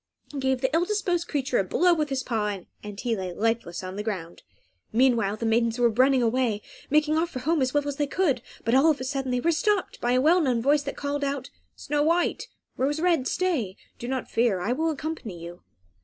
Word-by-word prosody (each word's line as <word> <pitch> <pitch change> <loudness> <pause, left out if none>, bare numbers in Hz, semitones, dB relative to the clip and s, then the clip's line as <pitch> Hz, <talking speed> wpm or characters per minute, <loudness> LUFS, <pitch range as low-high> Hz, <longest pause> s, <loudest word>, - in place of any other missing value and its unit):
He 285 - -3
gave 265 -1 0
the 260 - 0
ill 335 - +3
disposed 360 -4 -1
creature 275 -3 0
a - - +2
blow 350 - +3
with 305 -3 -1
his 265 -1 -1
paw, 210 -4 -1 0.2
and 210 -1 -8
he 240 -2 0
lay 185 -3 -4
lifeless 225 -4 -1
on 185 +1 -6
the - - -2
ground. 185 -6 -5 0.5
Meanwhile, 230 -4 +2
the 230 - -3
maidens 230 +1 +2
were 240 -1 +4
running 255 +2 +3
away, 230 -3 +1 0.3
making 305 +1 +3
off 335 +1 0
for 260 - -7
home 305 +4 0
as 260 -1 +1
well 290 0 0
as 285 -1 -3
they 290 - 0
could; 285 -6 +1 0.2
but 230 - +1
all 270 +5 +6
of 300 - +1
a - - -4
sudden 270 0 -2
they 250 0 +1
were 335 +7 +2
stopped 390 +4 0
by 240 +1 +1
a 255 - +4
well 340 +6 +5
known 255 -6 +1
voice 285 +5 +3
that 280 -1 -6
called 285 0 -2
out, 275 -1 -3 0.2
"Snow 295 0 -1
White, 335 +3 +1 0.3
Rose 285 +4 0
Red, 335 -6 +2
stay! 280 - -1 0.2
Do 240 - -5
not 260 -1 -2
fear. 225 -5 +1
I 205 +7 -1
will 320 +6 +1
accompany 300 - -5
you." 170 +1 -9
260 Hz, 230 wpm, -26 LUFS, 230-300 Hz, 0.5 s, all